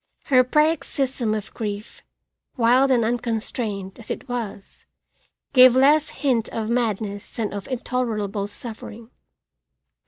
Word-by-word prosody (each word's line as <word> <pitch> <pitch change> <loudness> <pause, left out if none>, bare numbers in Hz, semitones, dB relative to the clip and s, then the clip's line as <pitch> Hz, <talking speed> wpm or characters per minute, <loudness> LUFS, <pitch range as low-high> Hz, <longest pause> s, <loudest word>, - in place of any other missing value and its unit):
Her 255 -2 +5
paroxysm 275 -5 +1
of 210 -1 -6
grief, 210 -2 -5 0.6
wild 250 +3 +4
and 240 -4 +3
unconstrained 225 -4 -3
as 225 - -12
it - - -5
was, 230 -5 -6 0.7
gave 255 -2 +8
less 290 +3 +4
hint 260 -5 0
of 225 0 -3
madness 215 -4 -2
than 220 -3 -2
of 200 -2 -6
intolerable 220 -6 -2
suffering. 225 +1 -10
235 Hz, 115 wpm, -23 LUFS, 215-255 Hz, 0.7 s, gave